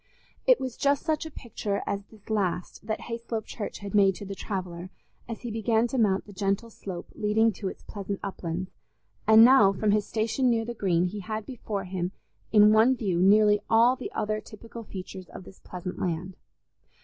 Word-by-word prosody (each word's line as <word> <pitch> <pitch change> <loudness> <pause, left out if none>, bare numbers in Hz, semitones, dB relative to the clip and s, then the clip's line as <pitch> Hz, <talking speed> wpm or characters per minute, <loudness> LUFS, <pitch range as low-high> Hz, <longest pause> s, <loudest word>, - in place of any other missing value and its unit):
It - - +6
was 260 -2 -5
just 280 -1 +2
such 315 -1 0
a - - -7
picture 215 -7 -4
as 200 0 -2
this 215 -2 -19
last 190 -1 -2
that 220 - -2
Hayslope 230 -1 -4
Church 210 - -6
had 200 - -6
made 195 -2 +5
to 205 - -8
the 195 - -5
traveller 185 -3 -5 0.4
as 230 - -5
he 240 - -5
began 225 +1 +1
to 260 - -1
mount 195 -4 +2
the 205 - -12
gentle 200 +4 -1
slope 185 -4 -8
leading 220 +1 +2
to 195 +1 -5
its - - -7
pleasant 200 -1 -5
uplands, 180 -2 -4 0.6
and 220 +1 +9
now 240 -6 +7
from 205 +2 +1
his 210 0 +1
station 230 +4 +1
near 225 -1 +1
the 240 - -4
Green 180 -6 +1
he 200 +3 -4
had 215 +2 -4
before 215 -6 -4
him 185 0 -3 0.4
in 210 0 +7
one 225 +4 +5
view 190 -8 0
nearly 210 +2 +5
all 235 +3 +5
the 255 - -7
other 215 0 -1
typical 230 +2 -10
features 185 -2 -8
of - - -10
this 190 - -14
pleasant 180 0 -7
land. 180 +1 -3
210 Hz, 195 wpm, -27 LUFS, 190-225 Hz, 0.6 s, and